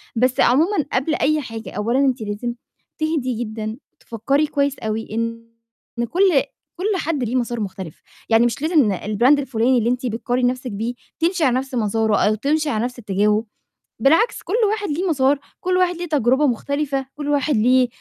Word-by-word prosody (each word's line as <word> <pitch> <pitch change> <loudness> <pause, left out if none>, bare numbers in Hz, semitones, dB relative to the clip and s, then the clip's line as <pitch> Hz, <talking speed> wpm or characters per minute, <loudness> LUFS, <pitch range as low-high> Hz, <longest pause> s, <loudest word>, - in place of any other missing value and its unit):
بس 255 +2 +1
عمومًا 310 +7 +3
قبل 275 +5 +1
أي 305 +1 +1
حاجة، 225 -3 -7
أولًا 230 +6 0
أنتِ 260 -3 +1
لازم 215 +3 -3 0.5
تهدي 260 -7 -1
جدًا، 220 +1 -5 0.2
تفكري 275 +7 0
كويس 280 -1 -1
أوي 220 0 -3
إن 230 +1 -3 0.6
كل 360 - 0 0.5
كل 385 +2 -1
حد 305 -6 -1
ليه 235 +2 -2
مسار 240 -2 -1
مختلف، 190 -5 -6 0.3
يعني 225 +1 +5
مش 240 +4 -1
لازم 320 +1 +3
ن 190 - -1
الBrand 240 +9 +3
الفلاني 255 -1 +1
اللي 235 0 +1
أنتِ 250 +1 -1
بتقارني 245 +2 -1
نَفْسِك 255 0 -5
بيه، 225 +4 -3 0.3
تمشي 340 0 +1
على 255 -3 +3
نَفْس 265 -1 -6
مساره 220 -1 +1
أو 215 +1 +2
تمشي 300 +7 0
على 220 -5 0
نَفْس 250 0 -6
اتجاهه، 210 +1 +1 0.5
بالعكس 320 - +3
كل 370 - -5 0.2
واحد 415 -4 -2
ليه 350 +5 -1
مسار، 280 -1 +2 0.2
كل 365 0 +1
واحد 360 -1 +2
ليه 350 - -4
تجربة 285 -1 +2
مختلفة، 275 +2 -1
كل 290 -1 -4
واحد 290 0 +1
ليه 250 +3 +4
255 Hz, 175 wpm, -21 LUFS, 225-295 Hz, 0.6 s, يعني